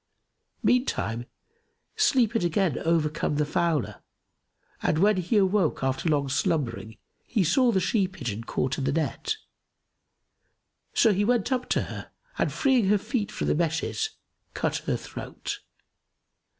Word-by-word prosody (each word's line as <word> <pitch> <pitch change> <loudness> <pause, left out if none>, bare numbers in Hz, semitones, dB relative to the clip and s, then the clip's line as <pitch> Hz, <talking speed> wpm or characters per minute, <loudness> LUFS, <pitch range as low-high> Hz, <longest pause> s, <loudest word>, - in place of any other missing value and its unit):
Meantime, 120 - +1 0.7
sleep 265 - +3
had 225 - +1
again 175 - +1
overcome 155 -2 0
the 150 0 +1
fowler; 155 - 0 0.8
and, 155 - +1
when 205 +4 +4
he 185 +5 +1
awoke 190 -7 +2
after 135 +5 0
long 145 -2 +2
slumbering, 130 - -1 0.3
he 215 -6 0
saw 245 - +4
the 195 - +2
she 195 0 +1
pigeon 120 - -5
caught 125 +3 -1
in 135 - -2
the 135 - +1
net; 160 - -1 1.6
so 225 -3 +5
he 200 +2 +1
went 240 +1 +1
up 255 -1 -1
to - - +2
her - - -8 0.3
and - - +1
freeing 260 -7 +2
her 210 +2 +4
feet 215 +1 -2
from - - -3
the - - +2
meshes, 165 - 0 0.5
cut - - 0
her - - +1
throat. - - -6
180 Hz, 140 wpm, -26 LUFS, 150-220 Hz, 1.6 s, so